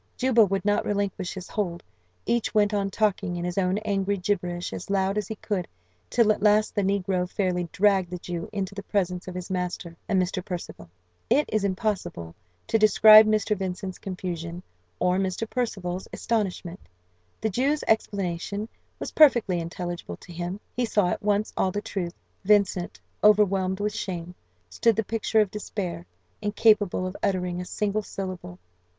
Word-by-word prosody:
Juba 250 Hz, -3 st, +5 dB
would 195 Hz, -1 st, -1 dB
not 205 Hz, 0 st, +2 dB
relinquish 200 Hz, -2 st, -2 dB
his 185 Hz, -1 st, -7 dB
hold; 175 Hz, -5 st, -3 dB, 0.4 s
each 235 Hz, -1 st, 0 dB
went 210 Hz, 0 st, +3 dB
on 200 Hz, -1 st, 0 dB
talking 200 Hz, -3 st, 0 dB
in 175 Hz, 0 st, -3 dB
his 180 Hz, 0 st, -3 dB
own 185 Hz, +1 st, +1 dB
angry 200 Hz, -1 st, 0 dB
gibberish 180 Hz, -2 st, -2 dB
as 185 Hz, -, -7 dB
loud 195 Hz, 0 st, +1 dB
as 210 Hz, -2 st, -1 dB
he 220 Hz, -, -5 dB
could, 200 Hz, -4 st, -3 dB, 0.4 s
till 225 Hz, -2 st, +4 dB
at 210 Hz, -, -1 dB
last 210 Hz, +1 st, +4 dB
the 205 Hz, -, +1 dB
negro 190 Hz, -2 st, 0 dB
fairly 180 Hz, -3 st, -1 dB
dragged 195 Hz, -3 st, +3 dB
the 180 Hz, -, -4 dB
Jew 175 Hz, -1 st, -5 dB
into 200 Hz, -2 st, -3 dB
the 200 Hz, -, -6 dB
presence 185 Hz, -3 st, -1 dB
of 185 Hz, -, -6 dB
his 180 Hz, +1 st, -6 dB
master 180 Hz, -2 st, -3 dB
and 195 Hz, -3 st, +3 dB
Mr. 185 Hz, 0 st, -1 dB
Percival. 170 Hz, -, -7 dB, 0.4 s
It 280 Hz, +6 st, +3 dB
is 215 Hz, -2 st, +2 dB
impossible 190 Hz, -, -2 dB, 0.3 s
to 225 Hz, -, +1 dB
describe 215 Hz, 0 st, +8 dB
Mr. 215 Hz, 0 st, +2 dB
Vincent's 185 Hz, -1 st, -4 dB
confusion, 175 Hz, -2 st, -5 dB, 0.3 s
or 180 Hz, -, +2 dB
Mr. 190 Hz, +3 st, -1 dB
Percival's 190 Hz, -7 st, -3 dB
astonishment. 190 Hz, -5 st, -2 dB, 0.6 s
The 220 Hz, -, -1 dB
Jew's 275 Hz, +8 st, +1 dB
explanation 200 Hz, 0 st, -1 dB, 0.3 s
was -, -, -5 dB
perfectly 240 Hz, -, +5 dB
intelligible 170 Hz, -, -5 dB
to 175 Hz, -, -13 dB
him; 175 Hz, +3 st, -4 dB, 0.2 s
he 245 Hz, -, +1 dB
saw 205 Hz, -5 st, +2 dB
at -, -, -2 dB
once 210 Hz, 0 st, 0 dB
all 190 Hz, -, +2 dB
the 205 Hz, -, -2 dB
truth. 185 Hz, -4 st, -4 dB, 0.3 s
Vincent, 195 Hz, -3 st, +2 dB, 0.2 s
overwhelmed 195 Hz, -3 st, +4 dB
with 210 Hz, 0 st, -1 dB
shame, 180 Hz, -4 st, -4 dB, 0.3 s
stood 220 Hz, -, +2 dB
the 220 Hz, -, 0 dB
picture 220 Hz, 0 st, +1 dB
of 205 Hz, -3 st, 0 dB
despair, 180 Hz, -5 st, -5 dB, 0.3 s
incapable 210 Hz, -3 st, +3 dB
of 185 Hz, +1 st, -5 dB
uttering 180 Hz, -3 st, -1 dB
a -, -, -6 dB
single 210 Hz, +2 st, -1 dB
syllable. 185 Hz, -, -6 dB
195 Hz, 165 wpm, -26 LUFS, 180-210 Hz, 0.6 s, describe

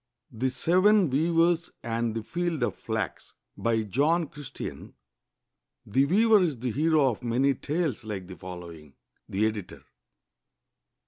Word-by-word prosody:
THE 125 Hz, +3 st, -1 dB
SEVEN 180 Hz, +6 st, +3 dB
WEAVERS 165 Hz, +3 st, +2 dB
AND 115 Hz, -1 st, -1 dB
THE 115 Hz, -, -3 dB
FIELD 170 Hz, 0 st, -2 dB
OF -, -, 0 dB
FLAX 110 Hz, -6 st, -4 dB, 0.2 s
BY 115 Hz, -1 st, 0 dB
JOHN 150 Hz, -, +1 dB
CHRISTL\N 145 Hz, -4 st, -8 dB, 0.9 s
[The 130 Hz, +7 st, +2 dB
weaver 215 Hz, +7 st, +5 dB
is 160 Hz, -7 st, 0 dB
the 125 Hz, +1 st, -2 dB
hero 150 Hz, +2 st, +3 dB
of 105 Hz, -, -8 dB
many 125 Hz, +4 st, +2 dB
tales 150 Hz, 0 st, -2 dB
like 105 Hz, -4 st, -5 dB
the 90 Hz, 0 st, -9 dB
following. 85 Hz, -6 st, -10 dB, 0.3 s
The 100 Hz, +3 st, +1 dB
Editor. 105 Hz, -4 st, -4 dB
130 Hz, 130 wpm, -27 LUFS, 110-165 Hz, 0.9 s, weaver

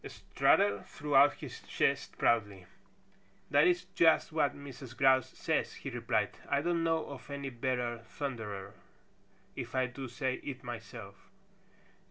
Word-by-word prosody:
Strutter 100 Hz, -1 st, +2 dB
threw 145 Hz, +6 st, -4 dB
out 140 Hz, +2 st, +7 dB
his -, -, -8 dB
chest -, -, 0 dB
proudly. 105 Hz, -5 st, +1 dB, 0.9 s
"That 145 Hz, +3 st, +6 dB
is 180 Hz, 0 st, +2 dB
just 165 Hz, -1 st, +4 dB
what 150 Hz, -3 st, +1 dB
Mrs. 135 Hz, -3 st, -10 dB
Grouse 130 Hz, -2 st, +4 dB
says," -, -, -1 dB
he -, -, -6 dB
replied. -, -, 0 dB, 0.2 s
"I 140 Hz, 0 st, +2 dB
don't 170 Hz, -1 st, +1 dB
know 165 Hz, -1 st, +1 dB
of 140 Hz, 0 st, -10 dB
any 140 Hz, -1 st, -4 dB
better 120 Hz, -1 st, -2 dB
thunderer 110 Hz, -6 st, -6 dB, 0.8 s
if -, -, -6 dB
I 130 Hz, 0 st, +3 dB
do 125 Hz, +2 st, -6 dB
say 130 Hz, +1 st, -2 dB
it 135 Hz, -2 st, -6 dB
myself." 110 Hz, -5 st, -9 dB
130 Hz, 140 wpm, -32 LUFS, 115-145 Hz, 0.9 s, out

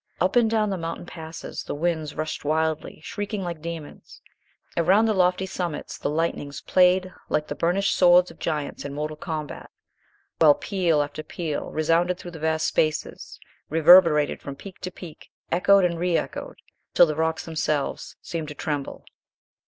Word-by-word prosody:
Up 185 Hz, +5 st, +1 dB
and 235 Hz, -2 st, +4 dB
down 215 Hz, -2 st, +1 dB
the 190 Hz, -, -2 dB
mountain 165 Hz, +1 st, -5 dB
passes 160 Hz, -2 st, -8 dB
the -, -, -5 dB
winds 160 Hz, -1 st, -2 dB
rushed 155 Hz, 0 st, -4 dB
wildly, 155 Hz, +1 st, -1 dB
shrieking 205 Hz, +1 st, -4 dB
like 170 Hz, -3 st, -5 dB
demons. 165 Hz, -2 st, -8 dB, 0.6 s
Around 190 Hz, +6 st, +4 dB
the 220 Hz, -, +2 dB
lofty 185 Hz, 0 st, +2 dB
summits 175 Hz, -5 st, -4 dB
the -, -, -2 dB
lightnings 150 Hz, -2 st, -2 dB
played 185 Hz, 0 st, +3 dB, 0.2 s
like 150 Hz, -, 0 dB
the -, -, -2 dB
burnished 185 Hz, +4 st, +1 dB
swords 180 Hz, 0 st, +5 dB
of -, -, -18 dB
giants 150 Hz, -3 st, -3 dB
in 140 Hz, 0 st, -6 dB
mortal 150 Hz, +1 st, -3 dB
combat, 155 Hz, -1 st, -6 dB, 0.7 s
while 150 Hz, -3 st, +7 dB
peal 170 Hz, -6 st, +1 dB
after 145 Hz, +1 st, -6 dB
peal 155 Hz, -1 st, -4 dB
resounded 165 Hz, +3 st, +1 dB
through 175 Hz, -, -9 dB
the 165 Hz, -, -9 dB
vast 160 Hz, 0 st, 0 dB
spaces, 155 Hz, -1 st, -1 dB, 0.3 s
reverberated 165 Hz, -1 st, +6 dB
from 140 Hz, -, -7 dB
peak 190 Hz, +5 st, -11 dB
to 185 Hz, -, -5 dB
peak, 175 Hz, -3 st, -12 dB, 0.2 s
echoed 190 Hz, +2 st, +5 dB
and 170 Hz, -1 st, -1 dB
re 175 Hz, -1 st, +2 dB
echoed, -, -, -5 dB, 0.4 s
till 175 Hz, -, +8 dB
the 155 Hz, -, -2 dB
rocks 160 Hz, +1 st, -1 dB
themselves 155 Hz, -3 st, -2 dB
seemed 165 Hz, -2 st, -4 dB
to 150 Hz, -, -8 dB
tremble. 145 Hz, -1 st, -4 dB
165 Hz, 165 wpm, -24 LUFS, 155-180 Hz, 0.7 s, till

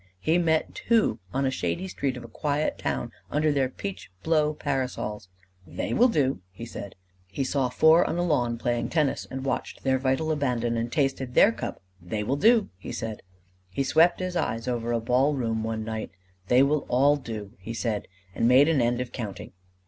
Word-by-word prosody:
He 160 Hz, -, +2 dB
met 160 Hz, -2 st, +1 dB
two 225 Hz, -, +1 dB
on 135 Hz, +1 st, 0 dB
a 130 Hz, -, +1 dB
shady 180 Hz, +7 st, -2 dB
street 135 Hz, -7 st, -2 dB
of 125 Hz, -, -8 dB
a -, -, -9 dB
quiet 145 Hz, +5 st, -1 dB
town 65 Hz, -4 st, -2 dB, 0.2 s
under 155 Hz, +1 st, +2 dB
their 135 Hz, -3 st, +1 dB
peach 190 Hz, -, -7 dB
blow 155 Hz, -2 st, +2 dB
parasols: 125 Hz, -9 st, -3 dB, 0.4 s
"They -, -, -3 dB
will 245 Hz, -, +5 dB
do!" 135 Hz, -, +1 dB
he 105 Hz, +5 st, -8 dB
said. 100 Hz, -4 st, -8 dB, 0.3 s
He 95 Hz, +9 st, -3 dB
saw 130 Hz, -1 st, 0 dB
four 160 Hz, +6 st, +5 dB
on -, -, -2 dB
a 175 Hz, -, +1 dB
lawn 125 Hz, -8 st, +1 dB
playing 120 Hz, 0 st, -1 dB
tennis, 150 Hz, -4 st, 0 dB
and 135 Hz, 0 st, -5 dB
watched 135 Hz, -, -3 dB
their 130 Hz, -1 st, +2 dB
vital 135 Hz, +4 st, 0 dB
abandon 125 Hz, -6 st, 0 dB
and 115 Hz, +1 st, -2 dB
tasted 135 Hz, -3 st, -1 dB
their -, -, +7 dB
cup: 115 Hz, -3 st, -6 dB, 0.2 s
"They 105 Hz, +5 st, -3 dB
will 130 Hz, +6 st, 0 dB
do!" 220 Hz, +7 st, +4 dB
he -, -, -7 dB
said. 110 Hz, -2 st, -5 dB, 0.5 s
He 95 Hz, +9 st, -1 dB
swept 165 Hz, +5 st, +4 dB
his 185 Hz, -1 st, -3 dB
eyes 115 Hz, -8 st, -1 dB
over 120 Hz, -1 st, -1 dB
a 115 Hz, -, +1 dB
ball 130 Hz, +5 st, +2 dB
room 115 Hz, -4 st, -1 dB
one 110 Hz, 0 st, -2 dB
night: 110 Hz, 0 st, -4 dB, 0.4 s
"They 125 Hz, +5 st, +5 dB
will 145 Hz, +1 st, +1 dB
all 140 Hz, +4 st, +4 dB
do!" 110 Hz, -7 st, -6 dB
he 115 Hz, +5 st, -6 dB
said, 110 Hz, -3 st, -2 dB, 0.3 s
and 115 Hz, -, +1 dB
made 130 Hz, +4 st, +6 dB
an 160 Hz, -5 st, +3 dB
end 120 Hz, +1 st, +1 dB
of 125 Hz, -, -5 dB
counting. 105 Hz, -6 st, -6 dB
130 Hz, 195 wpm, -26 LUFS, 115-150 Hz, 0.5 s, their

